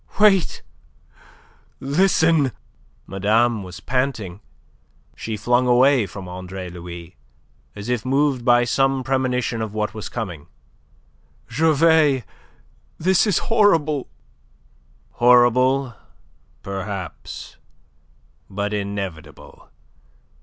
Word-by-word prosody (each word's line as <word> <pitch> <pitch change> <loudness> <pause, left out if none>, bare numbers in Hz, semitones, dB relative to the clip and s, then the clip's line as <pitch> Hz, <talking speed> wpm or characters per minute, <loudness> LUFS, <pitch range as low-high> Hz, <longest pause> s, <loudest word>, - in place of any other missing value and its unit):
"Wait! 200 -4 +3 1.2
Listen!" 160 -1 +2 0.5
Madame 110 +4 +1
was 90 -2 -9
panting. 125 -8 -2 0.8
She 110 -1 -5
flung 125 +3 +1
away 125 -2 +4
from 95 +1 -9
Andre 90 0 -7
Louis, 85 0 -10 0.6
as 100 +2 -8
if 125 -3 -1
moved 135 -1 +1
by 120 0 +4
some 135 +2 +1
premonition 125 -3 -1
of 110 -1 -5
what 105 -1 -2
was 110 -2 -7
coming. 90 -11 -6 1.0
"Gervais! 155 -3 +3 0.7
This 185 +5 +2
is 200 - +2 0.2
horrible!" 160 - +2 1.0
"Horrible, 125 +2 +4 0.7
perhaps, 95 -3 -7 0.9
but 100 +2 -3
inevitable. 100 -7 -6
120 Hz, 85 wpm, -21 LUFS, 100-135 Hz, 1.2 s, away